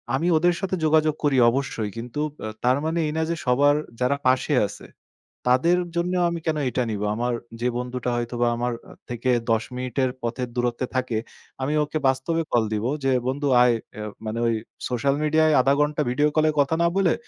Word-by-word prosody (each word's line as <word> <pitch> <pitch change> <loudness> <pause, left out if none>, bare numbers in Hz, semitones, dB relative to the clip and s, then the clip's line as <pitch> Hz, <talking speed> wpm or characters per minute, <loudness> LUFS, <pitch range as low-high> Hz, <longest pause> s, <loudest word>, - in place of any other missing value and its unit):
আমি 160 +6 0
ওদের 175 +2 +3
সাথে 190 -1 -1
যোগাযোগ 155 -1 +3
করি 145 -3 +2
অবশ্যই। 120 -4 -2
কিন্তু 125 +5 -4 0.2
আ - - -3 0.2
তার 125 +2 +3
মানে 165 +1 0
এই - - -2
না 160 - +1
যে 170 - 0
সবার 140 +3 +4 0.3
যারা 125 +3 +2
পাশে 130 +3 +2
আছে, - - -11 0.6
তাদের 145 +8 +4 0.2
জন্য 175 +1 0 0.2
আমি 170 0 -3
কেন 155 -1 +1
এটা 125 +1 0
নিবো? 105 -1 -2
আমার 120 +2 -1 0.3
যে 125 - +1
বন্ধুটা 125 0 -3
হয়তোবা 120 0 -1
আমার 120 +1 -1 0.2
আ - - -12 0.2
থেকে 120 +1 -2 0.2
১০ 115 0 +2
মিনিটের 130 +1 -1
পথের 120 +1 -3
দূরত্বে 120 +1 -1
থাকে, 130 -3 0 0.4
আমি 135 +3 0
ওকে 150 +1 -3
বাস্তবে 135 +6 0
কল 120 - +3
দিব 105 +1 -1 0.2
যে 135 - +2 0.2
বন্ধু 140 +2 -1
আয় 125 -1 +5
ইয়ে 110 -2 -6 0.2
মানে 110 +2 -3
ওই 115 - +2 0.4
সোশ্যাল 130 +3 +1
মিডিয়ায় 155 +1 +3
০.৫ 135 +2 +3
ঘন্টা 150 +1 +1
ভিডিও 145 +5 +2
কলে 155 0 +4
কথা 145 +3 +3
না 170 - +4
বলে 190 -4 +3
130 Hz, 190 wpm, -24 LUFS, 120-155 Hz, 0.6 s, আয়